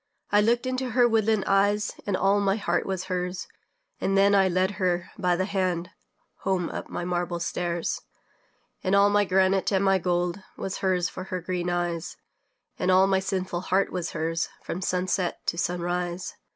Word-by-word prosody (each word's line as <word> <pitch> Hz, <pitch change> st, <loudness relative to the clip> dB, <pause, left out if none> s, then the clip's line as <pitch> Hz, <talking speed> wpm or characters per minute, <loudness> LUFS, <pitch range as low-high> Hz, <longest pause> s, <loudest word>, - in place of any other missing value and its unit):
I 205 Hz, -, +5 dB
looked 235 Hz, +3 st, +2 dB
into 255 Hz, 0 st, -2 dB
her 245 Hz, -1 st, +7 dB
woodland 220 Hz, -2 st, +2 dB
eyes, 205 Hz, +2 st, +2 dB, 0.2 s
And 195 Hz, -2 st, +1 dB
all 195 Hz, +2 st, +3 dB
my 195 Hz, -1 st, +2 dB
heart 175 Hz, -5 st, -1 dB
was 190 Hz, -2 st, -2 dB
hers; 180 Hz, 0 st, -3 dB, 0.5 s
And 195 Hz, 0 st, +1 dB
then 200 Hz, +1 st, +5 dB
I 195 Hz, -1 st, +5 dB
led 185 Hz, +2 st, +1 dB
her 180 Hz, -1 st, 0 dB
by 180 Hz, -3 st, +1 dB
the 185 Hz, +1 st, 0 dB
hand 185 Hz, -3 st, -1 dB, 0.5 s
Home 185 Hz, -3 st, -1 dB
up -, -, -6 dB
my 175 Hz, -, -4 dB
marble 175 Hz, -1 st, -1 dB
stairs. 170 Hz, 0 st, -2 dB, 0.8 s
And 190 Hz, +1 st, +2 dB
all 200 Hz, 0 st, +5 dB
my 205 Hz, 0 st, +3 dB
granite 190 Hz, +1 st, +2 dB
and 195 Hz, -1 st, +2 dB
my 195 Hz, -1 st, +4 dB
gold 175 Hz, +1 st, 0 dB, 0.2 s
Was 195 Hz, -, -4 dB
hers 185 Hz, -2 st, +1 dB
for 185 Hz, +2 st, -7 dB
her 185 Hz, -1 st, -3 dB
green 180 Hz, 0 st, -2 dB
eyes, 175 Hz, -1 st, -2 dB, 0.6 s
And 185 Hz, -, 0 dB
all 185 Hz, +1 st, +6 dB
my 195 Hz, -1 st, +2 dB
sinful 185 Hz, -2 st, -2 dB
heart 190 Hz, +2 st, +1 dB
was 175 Hz, -2 st, -3 dB
hers, 165 Hz, +1 st, -1 dB
From 180 Hz, -, -4 dB
sunset 185 Hz, 0 st, -1 dB
to -, -, 0 dB
sunrise. 175 Hz, 0 st, -2 dB
185 Hz, 180 wpm, -26 LUFS, 175-195 Hz, 0.8 s, her